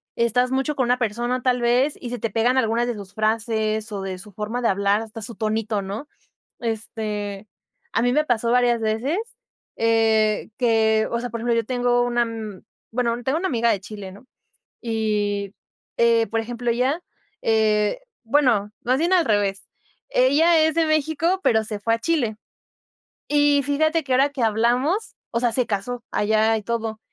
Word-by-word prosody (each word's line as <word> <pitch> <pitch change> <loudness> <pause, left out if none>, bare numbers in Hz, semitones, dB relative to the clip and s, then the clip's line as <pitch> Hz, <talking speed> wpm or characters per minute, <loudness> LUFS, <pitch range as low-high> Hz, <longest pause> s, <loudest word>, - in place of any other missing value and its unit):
estás 245 +2 +1
mucho 270 +3 0
con 260 -3 +1
una 250 +1 +2
persona 240 +3 -1
tal 250 -1 +1
vez 250 +5 +2
y 245 - -5
se 245 - -4
te 230 - -2
pegan 235 +5 +1
algunas 235 -1 +2
de 240 - -2
sus 200 -2 -10
frases 220 0 -1
o 200 -2 -4
de 190 -1 -4
su 205 +3 -12
forma 215 +5 -4
de 235 - +2
hablar, 200 +1 +2
hasta 225 0 -8
su 220 +2 -6
tonito, 215 -1 -1
¿no? 200 +9 -6 0.5
Este, 215 -3 -4 0.4
a - - +1
mí 245 +1 +2
me 305 +2 +3
pasó 235 -4 0
varias 245 -1 +3
veces, 225 +9 0 0.6
eh, 225 -2 +2
que, 220 -3 +2
o 235 - 0
sea, 245 +1 -4
por 230 0 -5
ejemplo, 235 0 +1
yo 230 -1 0
tengo 245 0 +1
una, 240 0 +1
mm, 220 -4 -7 0.3
bueno, 235 0 -1
tengo 275 +4 0
una 380 +2 -1
amiga 235 -2 +1
de 195 - -1
Chile, 205 -2 -8
¿no? 205 +6 -15 0.6
Y, 210 -3 -1 0.4
eh 230 -1 +4
por 225 0 0
ejemplo, 240 +1 -3
ella, 260 +8 0 0.4
eh, 215 - +2 0.2
bueno, 230 -5 +2
más 255 +2 +1
bien 340 +4 +1
al 350 -3 +4
revés. 200 -2 0 0.4
Ella 305 +7 +4
es 315 0 +3
de 330 -1 +3
México, 315 +4 +1
pero 220 -7 +3
se 210 -1 -5
fue 225 +2 +1
a 230 - -2
Chile 240 -6 0 0.9
y 290 -1 +3
fíjate 315 +4 +1
que 265 - -2
ahora 270 +3 +4
que 280 -3 -4
hablamos, 240 - +1
o 235 - -1
sea 240 -1 +1
se 250 +1 +1
casó 235 +4 -3
allá 220 +1 +2
y 215 - -4
todo, 225 0 -3
230 Hz, 180 wpm, -23 LUFS, 215-255 Hz, 0.9 s, eh